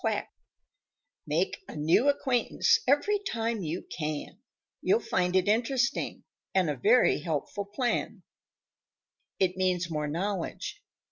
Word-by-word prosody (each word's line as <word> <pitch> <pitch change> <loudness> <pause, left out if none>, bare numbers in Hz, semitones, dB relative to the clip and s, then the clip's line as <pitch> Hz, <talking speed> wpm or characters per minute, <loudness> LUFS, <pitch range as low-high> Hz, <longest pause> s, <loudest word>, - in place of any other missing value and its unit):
QUACK - - -1 1.0
Make - - 0
a - - -9
new 165 - +3
acquaintance 260 -4 +2
every 345 +10 +3
time 230 - -2
you 165 +1 -3
can; 150 -2 -5 0.4
You'll 415 +4 +3
find 180 - 0
it 185 0 +3
interesting 245 +5 0 0.3
and 180 -5 +3
a - - -3
very 225 - +4
helpful 165 +5 -3
plan. 235 +5 -2 1.1
It 185 -1 +1
means 180 -2 0
more 150 -1 -1
knowledge. 180 +4 -3
195 Hz, 120 wpm, -29 LUFS, 170-245 Hz, 1.1 s, very